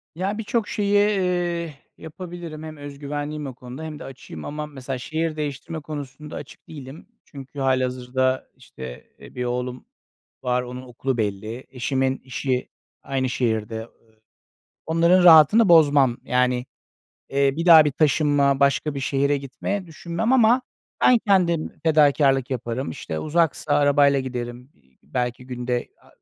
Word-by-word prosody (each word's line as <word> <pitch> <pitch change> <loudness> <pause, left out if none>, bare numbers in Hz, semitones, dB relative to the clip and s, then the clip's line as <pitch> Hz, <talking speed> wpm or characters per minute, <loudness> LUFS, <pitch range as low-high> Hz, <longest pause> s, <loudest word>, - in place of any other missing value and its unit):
Ya, 195 +4 -2
birçok 225 0 -1
şeyi, 200 -1 -1
eee, 180 -5 +1 0.2
yapabilirim. 170 -1 -8
Hem 155 -1 -8
özgüvenliyim 145 +1 -5
o 130 - -8
konuda 125 +4 -9
hem 155 -2 -7
de - - -8
açığım. 125 - -10
Ama 150 +1 -4
mesela 135 -3 -6
şehir 160 +5 -2
değiştirme 150 +2 -4
konusunda 145 0 -8
açık 145 - -10
değilim. 145 +2 -10 0.2
Çünkü 140 0 -10
hâlihazırda, 130 0 0
işte, 65 -1 -10
e, - - -14
1 125 - -2
oğlum 125 +1 -3 0.6
var, 125 0 +1
onun 125 +1 -7
okulu 130 +1 -3
belli. 110 +3 -3
Eşimin 130 +1 -1
işi 130 0 -2 0.3
aynı 130 -1 -1
şehirde. 110 -2 -1 0.3
I - - -37 0.7
onların 170 +3 +4
rahatını 175 +6 +7
bozmam. 145 -7 +5
Yani, 125 0 +1 0.7
eee, 140 0 +2
bir 165 +2 -2
daha 160 -3 +9
bir 150 - 0
taşınma, 145 -1 +2
başka 140 +2 +2
bir 140 - -4
şehre 140 +2 +1
gitme 140 +8 -4
düşünmem 170 +7 -2
ama 245 0 +5 0.4
ben 250 - +6
kendim 175 -5 +1
fedakârlık 145 -4 +3
yaparım. 125 +1 -3
İşte, 80 - -5
uzaksa 155 - 0
arabayla 145 -1 +4
giderim. 125 0 -6
İii, 65 -2 -33
belki 125 0 -3
günde 125 -1 -3
a - - -22
140 Hz, 140 wpm, -23 LUFS, 125-160 Hz, 0.7 s, daha